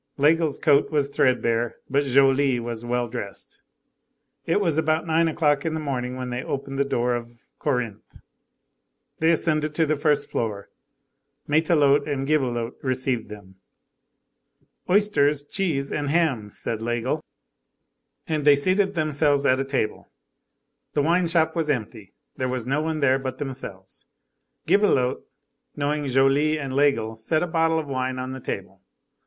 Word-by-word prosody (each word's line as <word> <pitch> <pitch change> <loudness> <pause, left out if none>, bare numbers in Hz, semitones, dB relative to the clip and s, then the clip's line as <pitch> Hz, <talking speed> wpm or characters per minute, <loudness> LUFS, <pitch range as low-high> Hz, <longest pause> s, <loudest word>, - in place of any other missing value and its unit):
Laigle's 155 +1 +3
coat 145 -2 +3
was 145 -3 0
threadbare, 120 -4 +1
but 140 +2 +1
Joly 135 -1 +3
was 115 -1 -5
well 120 0 -1
dressed. 115 -4 -7 0.9
It 165 - +2
was 165 -6 +1
about 160 +1 +1
nine 165 0 +2
o'clock 150 -3 +1
in 160 -1 -2
the - - -2
morning, 130 -4 -3
when 125 -1 -5
they 125 +1 -3
opened 135 0 -4
the - - +4
door 125 -3 0
of 120 +1 -7
Corinthe. 125 -8 -3 1.0
They 160 - +3
ascended 155 -2 +1
to 160 - +3
the 155 0 +1
first 150 0 +1
floor. 105 -3 -3 0.8
Matelote 150 -2 +3
and 135 -2 -2
Gibelotte 125 -6 0
received 130 -3 -1
them. 100 -3 -12 1.3
"Oysters, 180 -8 +3
cheese, 145 -4 -2
and 145 -1 -2
ham," 140 -10 +1
said 110 +2 -4
Laigle. 120 +6 -2 1.0
And 155 -2 -2
they 145 0 +7
seated 190 +6 +2
themselves 145 -2 +1
at 130 -1 +3
a - - +1
table. 135 -5 -3 0.9
The 145 - +2
wine 170 +3 +2
shop 160 -1 +2
was 160 -2 -1
empty; 110 -6 -3 0.2
there 130 -1 -2
was 125 -2 -3
no 140 +4 0
one 155 -1 -2
there 135 -1 +3
but 130 -1 -5
themselves. 110 -9 -7 0.6
Gibelotte, 170 -9 +2 0.5
knowing 145 0 -1
Joly 135 +4 +3
and 135 -3 -5
Laigle, 115 -6 +1
set 155 +9 0
a - - +1
bottle 165 -1 +1
of 155 -2 -3
wine 130 -1 -2
on 130 0 -4
the 130 - -6
table. 95 -5 -6
140 Hz, 150 wpm, -24 LUFS, 125-155 Hz, 1.3 s, they